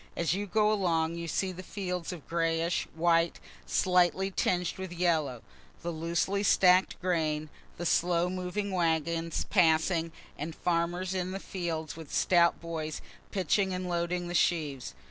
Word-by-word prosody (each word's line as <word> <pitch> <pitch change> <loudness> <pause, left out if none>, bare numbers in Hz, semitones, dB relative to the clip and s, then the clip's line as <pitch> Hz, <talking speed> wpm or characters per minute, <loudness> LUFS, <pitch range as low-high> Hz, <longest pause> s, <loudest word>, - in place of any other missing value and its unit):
As 165 -2 +1
you 205 +2 -2
go 210 +2 +3
along 165 -5 +1
you 170 0 -5
see 190 +3 -1
the 185 0 -8
fields 180 -3 -4
of 170 -5 -9
grayish 165 0 0
white 165 0 +2 0.3
slightly 185 +1 +2
tinged 180 -1 0
with 190 -2 -5
yellow, 160 -8 0 0.4
the 170 - -2
loosely 170 +5 -1
stack'd 185 -2 +4
grain, 155 -4 0 0.3
the 175 - -4
slow 175 +1 +2
moving 185 +2 -3
wagons 165 -1 0
passing, 165 -2 +3 0.3
and 155 +2 -4
farmers 175 +2 -1
in 185 0 -2
the 195 - -3
fields 165 -5 -4
with 160 -3 -10
stout 170 -2 +3
boys 160 -2 -4 0.3
pitching 190 +1 +1
and 180 0 -4
loading 175 0 -1
the 175 - -4
sheaves. 150 - 0
175 Hz, 145 wpm, -30 LUFS, 165-185 Hz, 0.4 s, stack'd